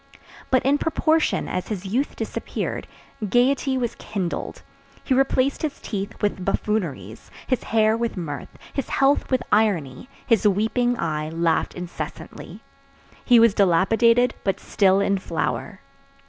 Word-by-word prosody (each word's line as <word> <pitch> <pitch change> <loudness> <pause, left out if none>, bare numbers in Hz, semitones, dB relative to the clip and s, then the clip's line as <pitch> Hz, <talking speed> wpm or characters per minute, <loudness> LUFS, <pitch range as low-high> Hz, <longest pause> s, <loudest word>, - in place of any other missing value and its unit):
But 260 -1 +2
in 285 +2 +3
proportion 320 0 +1
as 180 - -3
his 200 -3 -5
youth 245 +9 -1
disappeared, - - -4 0.4
gayety 260 +4 +2
was 240 -2 -1
kindled; 185 -5 -5 0.4
he 265 - 0
replaced 270 +1 +2
his 305 -3 -3
teeth 200 0 -5
with 205 -2 0
buffooneries, 170 - -3 0.2
his 255 - -1
hair 220 0 +3
with 230 -2 -2
mirth, 150 -5 -5 0.2
his 275 - -3
health 275 +1 +2
with 255 -1 +1
irony, 200 - +1 0.2
his 225 -3 +3
weeping 225 +5 +1
eye 155 -4 -2
laughed 165 0 0
incessantly. 180 -1 -8 0.6
He 245 -2 +6
was 230 -2 +5
dilapidated 225 +6 +3
but 195 - 0
still 195 -1 +2
in 200 -1 +1
flower. - - -3
215 Hz, 135 wpm, -23 LUFS, 185-250 Hz, 0.6 s, He